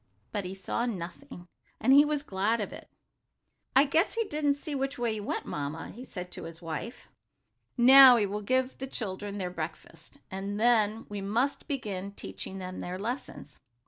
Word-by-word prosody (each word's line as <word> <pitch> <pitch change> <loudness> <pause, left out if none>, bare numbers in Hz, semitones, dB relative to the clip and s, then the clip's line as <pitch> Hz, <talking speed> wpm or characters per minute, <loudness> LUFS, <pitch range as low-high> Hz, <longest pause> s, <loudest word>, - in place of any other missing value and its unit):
But 205 -3 -3
he 185 +1 -5
saw 215 +5 -2
nothing, 180 +1 -7 0.3
and 265 - +4
he 285 +1 +9
was 295 -1 -1
glad 210 0 0
of 205 - -3
it. - - -11 0.9
"I 270 +2 +7
guess 320 +9 +2
he 455 - +1
didn't 295 -7 0
see 290 +1 -6
which 275 0 -2
way 240 -2 0
you 215 - -4
went, 205 - -3
Mamma," 150 +2 -4
he 240 +5 -10
said 180 -7 -7
to - - -6
his 165 0 -9
wife. 165 - -6 0.7
"Now 260 +1 +10
we 220 -3 +2
will 205 +1 -3
give 255 +4 0
the 265 - -4
children 205 -4 -4
their 180 -2 -3
breakfast, 180 - -8
and 200 +2 -4
then 225 -2 +3
we 205 -1 -5
must 245 +8 -1
begin 200 - -4
teaching 100 - -7
them 185 -1 -6
their 180 +1 -4
lessons. 235 +7 -6
215 Hz, 180 wpm, -29 LUFS, 190-265 Hz, 0.9 s, Now